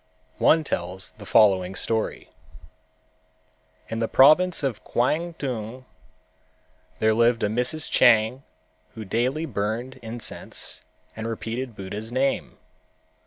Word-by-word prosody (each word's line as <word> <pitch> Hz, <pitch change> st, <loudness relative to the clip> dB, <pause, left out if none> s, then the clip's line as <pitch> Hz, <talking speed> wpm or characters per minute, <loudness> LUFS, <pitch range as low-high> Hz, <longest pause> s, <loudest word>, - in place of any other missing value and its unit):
One 160 Hz, 0 st, +4 dB
tells 90 Hz, -, -4 dB
the 105 Hz, -, -10 dB
following 95 Hz, -4 st, +4 dB
story: 110 Hz, +2 st, -2 dB, 1.6 s
In 115 Hz, -, -4 dB
the 115 Hz, -, 0 dB
province 155 Hz, +7 st, +5 dB
of 130 Hz, -6 st, -2 dB
Kwangtung 130 Hz, -4 st, -2 dB, 1.1 s
there 110 Hz, +3 st, +3 dB
lived 115 Hz, +1 st, +2 dB
a -, -, +3 dB
Mrs. 125 Hz, +8 st, 0 dB
Chang 115 Hz, +2 st, +4 dB, 0.5 s
who 110 Hz, -1 st, -7 dB
daily 125 Hz, +10 st, -1 dB
burned 120 Hz, +2 st, -3 dB
incense 115 Hz, +1 st, -4 dB, 0.3 s
and 110 Hz, 0 st, -5 dB
repeated 115 Hz, +2 st, -5 dB
Buddha's 105 Hz, +4 st, -6 dB
name. 135 Hz, +2 st, -1 dB
115 Hz, 105 wpm, -24 LUFS, 110-130 Hz, 1.6 s, province